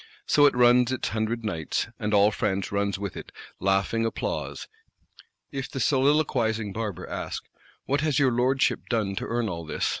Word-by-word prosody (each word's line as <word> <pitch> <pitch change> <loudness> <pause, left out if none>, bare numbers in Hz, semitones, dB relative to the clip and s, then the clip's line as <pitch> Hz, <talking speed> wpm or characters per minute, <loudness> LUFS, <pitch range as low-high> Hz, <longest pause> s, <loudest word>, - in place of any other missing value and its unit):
So 145 -1 +5
it 140 - +1
runs 125 0 +5
its 130 - -1
hundred 110 +1 -2
nights, 80 -7 -2
and 105 - -2
all 105 0 +5
France 100 -2 -1
runs 100 -1 0
with 100 -1 -5
it; - - -8 0.3
laughing 95 +4 +1
applause. 115 - -3 0.8
If 135 -1 -4
the 135 - -5
soliloquising 125 -6 +2
Barber 105 -5 -4
ask: - - -5 0.4
'What 140 +1 +1
has 150 -4 +1
your 135 -3 +4
Lordship 130 +3 +1
done 105 -5 0
to - - -3
earn 120 -1 -1
all 85 -4 -4
this? 80 - -2
115 Hz, 170 wpm, -26 LUFS, 100-130 Hz, 0.8 s, So